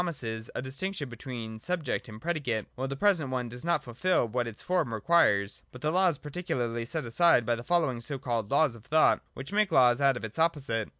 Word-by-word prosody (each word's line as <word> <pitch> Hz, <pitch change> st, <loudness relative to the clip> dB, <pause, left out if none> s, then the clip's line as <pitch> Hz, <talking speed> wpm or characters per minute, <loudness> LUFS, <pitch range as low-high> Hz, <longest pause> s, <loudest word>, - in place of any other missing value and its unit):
[iij -, -, -1 dB
mises 115 Hz, -9 st, -4 dB
a -, -, -3 dB
distinction 145 Hz, +4 st, -4 dB
between 115 Hz, -2 st, -7 dB
subject 165 Hz, -4 st, -2 dB
and 110 Hz, 0 st, -9 dB
predicate; 130 Hz, -8 st, -2 dB
while 130 Hz, +1 st, -3 dB
the 135 Hz, -, -4 dB
present 170 Hz, -4 st, +2 dB
one 125 Hz, -2 st, -2 dB
does 125 Hz, +1 st, -9 dB
not 170 Hz, -4 st, +1 dB
fulfil 125 Hz, +4 st, +1 dB
what 120 Hz, +2 st, -1 dB
its 115 Hz, -2 st, -7 dB
form 180 Hz, -10 st, 0 dB
requires. 110 Hz, -5 st, +2 dB
But 125 Hz, -, -11 dB
the 150 Hz, -, +1 dB
Law 185 Hz, +2 st, +4 dB
is 160 Hz, -, -2 dB
particularly 135 Hz, -8 st, -3 dB
set 155 Hz, +3 st, -4 dB
aside 125 Hz, +1 st, +4 dB
by 120 Hz, -, +2 dB
the 120 Hz, 0 st, -4 dB
following 155 Hz, -6 st, +1 dB
so 140 Hz, +4 st, -4 dB
called 120 Hz, -5 st, -2 dB
Laws 140 Hz, -3 st, +3 dB
of 110 Hz, -, -14 dB
Thought, 155 Hz, +4 st, +4 dB
which 135 Hz, +9 st, -8 dB
make 210 Hz, -2 st, +2 dB
laws 125 Hz, -3 st, +5 dB
out 135 Hz, -2 st, +4 dB
of 115 Hz, -, -5 dB
its 110 Hz, +7 st, -8 dB
opposite. 140 Hz, -9 st, 0 dB
130 Hz, 225 wpm, -29 LUFS, 115-165 Hz, -, laws